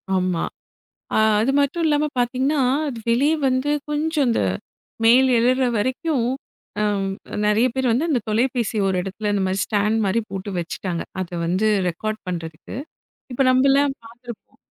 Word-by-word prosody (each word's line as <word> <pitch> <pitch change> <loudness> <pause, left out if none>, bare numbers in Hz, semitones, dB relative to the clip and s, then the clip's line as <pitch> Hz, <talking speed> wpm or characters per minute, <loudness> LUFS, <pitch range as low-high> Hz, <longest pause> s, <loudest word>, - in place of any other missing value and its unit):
ஆமா. 185 -2 0 0.7
அ - - +2 0.2
அது 245 +5 +1
மட்டும் 290 +4 0
இல்லாம 300 0 +2
பார்த்தீங்கன்னா? 260 +4 +1 0.3
அது 245 -4 -5
வெளிய 275 +6 +3 0.2
வந்து 260 +3 0 0.2
கொஞ்சம் 300 -1 0
அந்த 230 - +1 0.6
மேல 250 +4 +6
எழுற 255 +3 +3
வரைக்கும் 260 +3 0 0.5
ஆ - - +2 0.6
நெறைய 210 +4 +3
பேர் 260 -1 0
வந்து 255 +9 +1
அந்தத் 250 -9 0
தொலைபேசிய 230 -1 0
ஒரு 190 - 0
இடத்துல 200 +3 -3
இந்த 200 -1 +1
மாதிரி 190 +1 -1
ஸ்டாண்ட் 210 +1 +1
மாதிரி 210 +5 +1
போட்டு 195 +1 -5
வச்சுட்டாங்க. 170 +1 -3 0.2
அதை 180 -1 -5
வந்து 185 +5 +1 0.2
ரெகார்ட் 215 +5 -3
பண்றதுக்கு. 165 0 -6 0.6
இப்ப 245 - -1
நம்ம 260 +2 +4
எல்லாம் 280 0 +3
பார்த்திருப்போம். 235 0 -12
235 Hz, 145 wpm, -22 LUFS, 200-265 Hz, 0.7 s, மேல